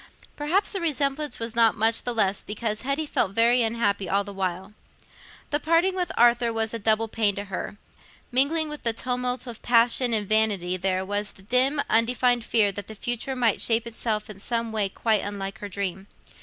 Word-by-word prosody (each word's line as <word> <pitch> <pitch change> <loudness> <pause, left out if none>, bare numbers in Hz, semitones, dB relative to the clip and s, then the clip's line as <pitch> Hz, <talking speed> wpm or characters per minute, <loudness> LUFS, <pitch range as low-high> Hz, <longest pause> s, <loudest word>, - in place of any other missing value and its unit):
Perhaps 340 +8 +1
the 390 - -3
resemblance 295 -2 0
was 230 0 -4
not 230 -1 +4
much 225 +2 +3
the 245 - -2
less 205 -4 0
because 215 +1 -3
Hetty 275 +4 -1
felt 195 -9 -1
very 235 +3 +4
unhappy 220 -4 0
all 200 +1 +1
the 200 0 -9
while. 190 +1 -4 0.8
The 295 - +1
parting 335 +4 +2
with 360 -1 -2
Arthur 240 0 +4
was 225 0 -2
a 230 - -3
double 220 +1 +1
pain 215 -2 +1
to 200 - -4
her—mingling 265 - -2
with 300 0 -7
the 230 - +1
tumult 250 +1 -3
of 235 -3 -8
passion 240 +1 +3
and 210 -3 0
vanity 205 -4 +2
there 185 0 -1
was 205 +1 -3
a 190 - -16
dim 260 +6 +2
undefined 245 +1 +2
fear 215 -3 +2
that 200 0 -7
the 220 - -9
future 240 +5 -2
might 235 -4 +1
shape 230 0 +1
itself 220 -2 -3
in 210 -3 -10
some 230 +1 -2
way 210 -3 0
quite 215 +1 0
unlike 195 -1 -5
her 205 - -6
dream. 190 0 -4
225 Hz, 190 wpm, -25 LUFS, 205-250 Hz, 0.8 s, not